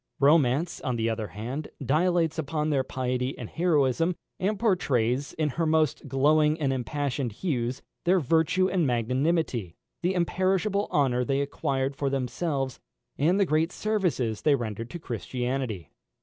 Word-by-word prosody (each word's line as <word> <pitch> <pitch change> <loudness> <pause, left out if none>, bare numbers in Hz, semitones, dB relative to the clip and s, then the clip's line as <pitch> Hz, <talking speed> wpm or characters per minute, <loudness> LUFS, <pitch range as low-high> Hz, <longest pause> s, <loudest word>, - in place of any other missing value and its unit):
Romance, 145 +2 +3
on 130 - -1
the 115 -1 0
other 110 -1 -3
hand, 125 +10 -5
dilates 165 +4 +1
upon 155 0 -1
their 135 -2 +2
piety 125 0 -2
and - - -7
heroism, 165 -1 +2 0.2
and 200 +3 0
portrays, 140 - +1
in 155 -1 0
her 165 +4 -1
most 155 -2 +1
glowing 150 +3 +3
and 135 -3 +1
impassioned 135 0 -2
hues, 125 - -2 0.2
their 185 +2 +4
virtue 165 +5 +2
and 180 -5 +1
magnanimity, 125 - 0 0.3
the 180 +2 0
imperishable 190 +3 +1
honour 125 -4 +2
they 135 +2 0
acquired 135 -1 -1
for 140 0 -1
themselves, 135 +1 -2 0.4
and 170 +7 +3
the 200 - +4
great 160 +1 +1
services 175 - -1
they 150 -2 +4
rendered 115 -2 -4
to 175 - -6
Christianity. 125 - -3
140 Hz, 145 wpm, -27 LUFS, 125-165 Hz, 0.4 s, their